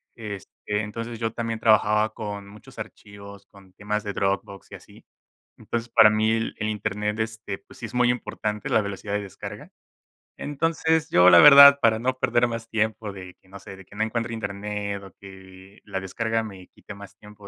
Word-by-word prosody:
Este, 105 -4 -8 0.3
entonces, 115 +2 -6
yo 115 -1 -2
también 115 -1 -4
trabajaba 110 0 +3
con 100 -2 -7
muchos 105 +1 -15
archivos, 100 -1 -11
con 95 -2 -19
temas 105 +2 -3
de 100 - -4
Dropbox 100 0 -3
y - - -8
así. - - -17 0.5
Entonces, 120 0 -5
para 110 -2 +6
mí, 110 +1 +1
el 115 0 -2
el 105 - -2
Internet, 105 0 -3
este, 110 -3 -4
pues, - - -19
sí 115 - -6
es 110 - -13
muy 125 0 +3
importante, 105 -3 -4
la 110 - +2
velocidad 100 0 -6
de 105 - 0
descarga. 100 -2 -9 0.7
Entonces, 160 +2 -1
yo, 90 +1 +6
la - - +9
verdad, 140 -1 +10
para 115 -2 +3
no 125 +3 -1
perder 120 -1 +2
más 115 -1 -6
tiempo, 110 -1 -2
de 95 -2 -10
que, 95 - -26
no 100 - -10
sé, 100 0 -11
o - - -16
que 100 - -17
no 110 - 0
encuentre 115 +1 -3
internet 100 -1 -5
o 95 - -12
que 95 0 -14
la 95 - -5
descarga 115 +4 -2
me 95 -4 -10
quite - - -13
más 100 -1 -13
tiempo 105 -1 -15
105 Hz, 190 wpm, -24 LUFS, 100-115 Hz, 0.7 s, verdad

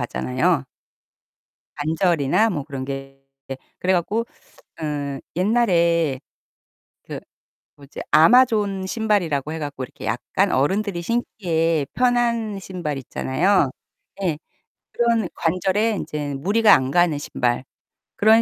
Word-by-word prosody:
하잖아요. 65 0 0 1.1
관절이나 165 +5 +2
뭐 150 -8 -3
그런 135 -3 -6
게 135 0 -7 0.3
예. 135 - -3 0.2
그래 185 +1 +1
갖고 185 +6 0 0.6
어 145 -2 -3 0.2
옛날에 170 - +2 0.8
그 - - -7 0.6
뭐지 140 -1 -11
아마존 205 -1 +4
신발이라고 180 - 0
해 160 - -4
갖고 145 -3 -5
이렇게 - - -12
약간 - - 0
어른들이 180 +6 0
신기에 165 -8 0
편한 235 -4 +1
신발 175 -7 -5
있잖아요. 145 +5 +1 0.5
예. 165 -5 0 0.5
그런 230 -4 +1
관절에 190 +6 +1
인제는 145 -5 -4
무리가 210 +4 +5
안 130 -1 +1
가는 175 -2 +3
신발. 125 -3 -1 0.5
그런 220 +2 +5
170 Hz, 240 characters per minute, -22 LUFS, 145-210 Hz, 1.1 s, 무리가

